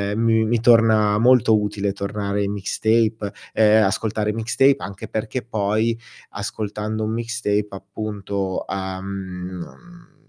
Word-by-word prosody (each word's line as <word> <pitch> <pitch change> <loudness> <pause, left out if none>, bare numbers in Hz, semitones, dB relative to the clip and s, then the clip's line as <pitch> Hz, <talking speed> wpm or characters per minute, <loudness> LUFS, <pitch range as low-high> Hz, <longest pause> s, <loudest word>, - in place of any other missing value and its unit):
mi 110 -1 +3
mi 115 +1 +1
torna 110 -3 +5
molto 115 -2 +5
utile 100 -1 -2
tornare 100 0 -2
ai 100 - 0
mixtape, 110 +1 0 0.2
ehm, 110 0 +5
ascoltare 105 +2 0
mixtape 130 +5 +3
anche 95 0 -7
perché 110 +3 -3
poi 110 +1 0 0.3
ascoltando 105 +1 -4
un 110 - -1
mixtape 115 -3 -1
appunto, 100 -1 -4
uhm, 95 0 -4
mhmm, 95 - -8
105 Hz, 115 wpm, -22 LUFS, 100-115 Hz, 0.3 s, torna